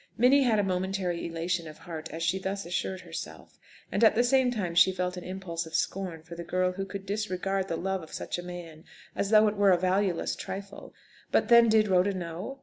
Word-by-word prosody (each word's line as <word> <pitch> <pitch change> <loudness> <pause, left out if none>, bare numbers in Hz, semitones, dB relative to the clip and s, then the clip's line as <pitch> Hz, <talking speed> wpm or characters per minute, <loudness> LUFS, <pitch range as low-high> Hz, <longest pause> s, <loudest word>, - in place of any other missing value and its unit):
Minnie 255 +4 +5
had 235 -5 +3
a 205 - +2
momentary 185 -2 -2
elation 170 0 -2
of 155 - -10
heart 165 -2 -7
as 165 +1 -4
she 175 +4 +1
thus 195 0 -4
assured 185 +2 -3
herself, - - -9 0.3
and - - 0
at 220 - +6
the 240 - +4
same 260 0 +3
time 205 -8 -2
she 170 +2 +6
felt 180 0 -2
an 180 - -7
impulse 180 -3 -5
of 160 - -7
scorn 180 -4 -2
for 170 +1 -11
the 170 0 -6
girl 185 +1 0
who 195 +1 -4
could 195 0 -7
disregard 195 -2 -2
the 165 - -2
love 190 +1 -2
of 160 - -12
such - - -4
a - - -6
man, 170 -3 -9 0.3
as 200 - -1
though 215 0 +6
it 210 - 0
were 200 -1 +4
a 180 - +5
valueless 185 0 0
trifle. 195 +1 -7 0.4
But, - - +2
then, 235 -1 +7
did 215 -1 +4
Rhoda 190 +1 +2
know? 180 +9 -5
185 Hz, 225 wpm, -28 LUFS, 175-200 Hz, 0.4 s, then